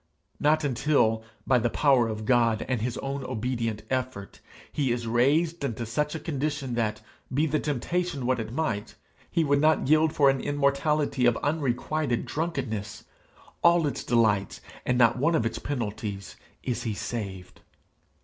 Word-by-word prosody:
not 155 +1 +3
until, 125 -5 +2 0.2
by 130 -2 +4
the 120 +1 +1
power 130 -3 +3
of 110 -1 -4
God 115 -2 +2
and 125 -4 -1
his 120 +1 -2
own 135 0 -4
obedient 115 -3 -2
effort, 130 -6 -3 0.3
he 135 -4 0
is 120 0 -2
raised 145 +8 +2
into 120 -3 -2
such 150 +7 -1
a - - -3
condition 140 -4 -3
that, 110 -2 -1 0.3
be 145 +4 +2
the 155 0 0
temptation 150 +1 -2
what 130 0 +1
it 110 0 -4
might, 115 -7 -2 0.3
he 165 - +1
would 145 -1 +2
not 155 -3 +3
yield 155 +2 +4
for 145 -2 +3
an 135 - -3
immortality 140 -1 +1
of 120 - +3
unrequited 145 -2 -1
drunkenness 110 -11 -3 0.6
all 170 -1 +5
its 145 - -2
delights 110 -5 +2 0.3
and 125 - +2
not 120 0 +4
one 165 +5 +2
of 115 - +1
its 115 - -2
penalties 105 -7 -4 0.3
is 125 -2 -2
he 110 -4 -3
saved. 100 -5 -6
130 Hz, 160 wpm, -27 LUFS, 115-150 Hz, 0.6 s, all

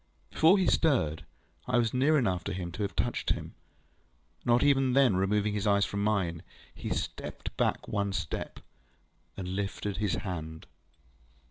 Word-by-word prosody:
Before 165 +5 +5
he 190 - +2
stirred, 120 - +1 0.4
I 125 -1 +2
was 115 -2 +1
near 140 +5 +3
enough 95 -9 0
to - - -2
him 90 -2 -4
to 100 - -6
have 100 - -2
touched - - -1
him. - - -8 0.9
Not 120 0 +3
even 135 -3 +3
then 130 -7 +5
removing 105 +2 +1
his 105 0 -1
eyes 100 0 +4
from 100 0 -3
mine, 95 -6 0 0.3
he - - -6
stepped - - -4
back - - 0
one 100 -1 -1
step, 95 - -4 0.8
and 90 -2 -5
lifted 100 +1 -3
his 105 -2 0
hand. 80 -4 -5
105 Hz, 155 wpm, -29 LUFS, 95-125 Hz, 0.9 s, Before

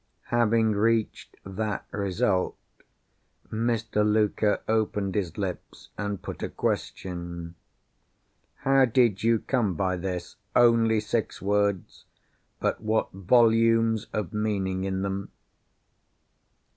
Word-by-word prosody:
Having 115 -1 +3
reached 110 +1 0
that 100 +1 -3
result, 95 -1 0 0.9
Mr. 115 -1 0
Luker 105 0 +2
opened 105 -3 0
his 90 -5 -2
lips, 95 -3 -6
and 100 -2 -3
put - - -7
a - - -2
question: 85 -2 -4 1.1
"How 135 -1 +5
did 115 -4 +2
you 115 0 +3
come 110 -5 0
by 95 +2 0
this?" 90 -1 -5 0.2
Only 115 -2 +4
six 110 0 -2
words! 100 -1 -1 0.5
But - - -1
what 110 0 0
volumes 115 +2 +3
of 105 -6 -3
meaning 95 -3 -1
in 95 0 -2
them! 100 0 -3
105 Hz, 105 wpm, -26 LUFS, 95-115 Hz, 1.1 s, How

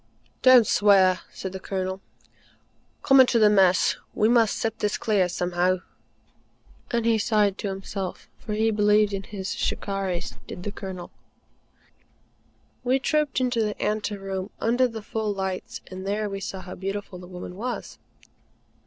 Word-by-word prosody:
"Don't 255 -3 +7
swear," 195 -4 +4
said 190 - -6
the 190 - -6
Colonel. 190 0 -3 1.0
"Come 270 -1 +6
into 255 -2 +6
the 215 -2 +6
Mess. 190 -3 +4 0.2
We 215 - +3
must 230 -2 +4
sift 225 -1 -2
this 210 - 0
clear 200 -5 +1
somehow," 180 +1 0 1.1
and 235 -1 0
he 230 -1 +3
sighed 210 -2 +2
to - - -3
himself, 195 -1 -5
for 215 - -5
he 220 +1 +2
believed 210 0 +3
in 195 - -2
his 195 -1 -5
"Shikarris," 195 -3 -3
did 180 - -8
the 205 - -4
Colonel. 190 -3 -7 1.7
We 255 +1 +3
trooped 300 0 0
into 250 -2 +1
the 210 -1 -2
ante 210 0 -1
room, 195 0 -4
under 245 +3 +2
the 225 -3 -8
full 220 0 -2
lights, 190 -1 -4
and 185 0 -7
there 210 +1 -1
we 195 - -4
saw 190 -1 -5
how 185 0 -8
beautiful 195 0 -5
the 180 - -11
woman 180 0 -8
was. 240 +5 -5
205 Hz, 155 wpm, -25 LUFS, 190-220 Hz, 1.7 s, Don't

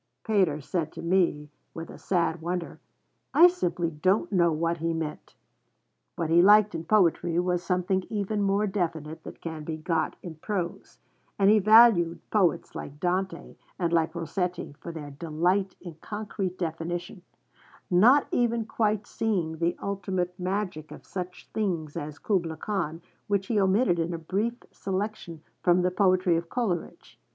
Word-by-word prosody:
Pater 190 -9 +2
said 160 +2 -2
to 165 - -8
me, 170 -5 +1 0.2
with 165 0 -7
a - - -12
sad 170 -3 0
wonder, 175 +1 -4 0.6
'I 350 +2 +9
simply 175 - -1
don't 185 +9 +1
know 170 -4 +3
what 165 +2 0
he 165 0 -1
meant.' 155 -2 -5 0.8
What 165 -1 -2
he 170 +1 +6
liked 210 +2 +6
in 165 - -5
poetry 175 -4 +2
was 180 0 +1
something 185 +1 0
even 210 0 -1
more 200 +1 +2
definite 165 -6 -3
than - - -9
can 160 -2 -7
be 155 +1 -4
got 160 0 -1
in 165 -4 -8
prose; 180 0 -4 0.4
and 200 0 +5
he 215 - +6
valued 210 -5 +6
poets 195 -5 +1
like 145 +1 -8
Dante 185 +3 -2 0.2
and 170 -2 -1
like 165 0 +1
Rossetti 175 0 -3
for 170 - -7
their 150 -3 -8
'delight 170 +6 0
in 175 -3 -9
concrete 205 -3 -4
definition,' 170 +2 -4 0.7
not 240 +11 +6
even 235 -2 +1
quite 215 -2 0
seeing 180 -10 -1
the 170 +1 0
ultimate 190 -3 -2
magic 180 -4 -3
of - - -12
such 180 -1 -7
things 170 -8 -2
as 150 +1 -5
Kubla 170 -6 -1
Khan, 170 -6 -3 0.2
which 200 -1 0
he 215 0 +1
omitted 195 -1 +3
in 165 +1 -1
a - - -4
brief 200 +8 -2 0.2
selection 190 -4 -4 0.2
from 180 0 +3
the 180 - +2
poetry 185 -3 +3
of 170 0 -5
Coleridge. 205 -10 -3
180 Hz, 155 wpm, -27 LUFS, 165-200 Hz, 0.8 s, I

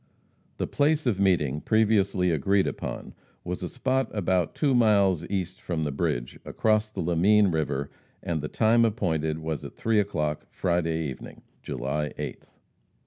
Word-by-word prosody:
The - - -1
place 150 +1 +1
of 110 -6 +1
meeting 75 -7 +2
previously 100 -5 +2
agreed 95 +6 +2
upon - - -5 0.3
was 90 0 -4
a 90 - -4
spot 130 0 0
about 90 -4 0
two 145 -3 +2
miles 100 -7 +3
east 95 -2 -3
from 80 -3 -2
the 75 - -1
bridge, - - -2
across 110 -1 +1
the 110 - -5
Lamine 95 +3 +3
river, 70 -3 -2 0.3
and 80 -3 -2
the 75 - -3
time 115 +5 +3
appointed 80 -9 0
was 80 -1 -4
at - - -9
3 110 -1 +1
o'clock 75 -7 -2
Friday 80 -3 -1
evening, 65 - -9 0.2
July 70 +4 -3
8th. - - -6
90 Hz, 150 wpm, -26 LUFS, 80-105 Hz, 0.3 s, miles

